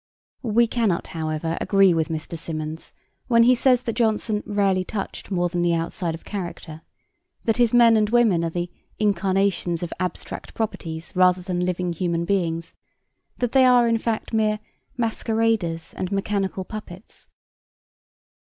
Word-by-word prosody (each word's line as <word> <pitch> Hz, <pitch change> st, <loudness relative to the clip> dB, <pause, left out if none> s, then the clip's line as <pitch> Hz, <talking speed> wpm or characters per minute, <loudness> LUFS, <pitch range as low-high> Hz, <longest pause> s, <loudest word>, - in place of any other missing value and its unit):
We 235 Hz, -1 st, +3 dB
cannot, 225 Hz, -6 st, 0 dB
however, 160 Hz, 0 st, -2 dB
agree 195 Hz, -2 st, +4 dB
with 160 Hz, -2 st, 0 dB
Mr. 160 Hz, +1 st, -4 dB
Symonds 155 Hz, -1 st, -6 dB, 0.3 s
when 230 Hz, -2 st, +5 dB
he 250 Hz, +2 st, +6 dB
says 250 Hz, 0 st, +3 dB
that 230 Hz, -, -2 dB
Jonson 220 Hz, -2 st, +1 dB
'rarely 195 Hz, -3 st, +1 dB
touched 195 Hz, +1 st, -6 dB
more 175 Hz, -3 st, +1 dB
than 175 Hz, 0 st, -2 dB
the 170 Hz, -1 st, +2 dB
outside 165 Hz, 0 st, -2 dB
of 165 Hz, -, -13 dB
character,' 175 Hz, -5 st, -6 dB, 0.6 s
that 225 Hz, -2 st, +1 dB
his 240 Hz, -2 st, +3 dB
men 235 Hz, -2 st, +6 dB
and 210 Hz, -1 st, +2 dB
women 225 Hz, -8 st, +3 dB
are 165 Hz, -, 0 dB
'the 175 Hz, +1 st, -4 dB, 0.3 s
incarnations 195 Hz, -3 st, +1 dB
of 175 Hz, -, -4 dB
abstract 180 Hz, -2 st, -5 dB
properties 165 Hz, -7 st, -4 dB
rather 180 Hz, 0 st, +4 dB
than 180 Hz, -1 st, -2 dB
living 180 Hz, -1 st, -1 dB
human 170 Hz, 0 st, -1 dB
beings,' 170 Hz, -3 st, -1 dB, 0.6 s
that 245 Hz, -2 st, -1 dB
they 265 Hz, -1 st, +5 dB
are 250 Hz, -2 st, +5 dB
in 230 Hz, -1 st, +2 dB
fact 225 Hz, 0 st, -3 dB
mere 215 Hz, -1 st, +2 dB, 0.4 s
'masqueraders 225 Hz, -7 st, 0 dB
and 185 Hz, +1 st, -4 dB
mechanical 195 Hz, -1 st, -1 dB
puppets.' 210 Hz, -2 st, -10 dB
190 Hz, 150 wpm, -23 LUFS, 170-225 Hz, 0.6 s, he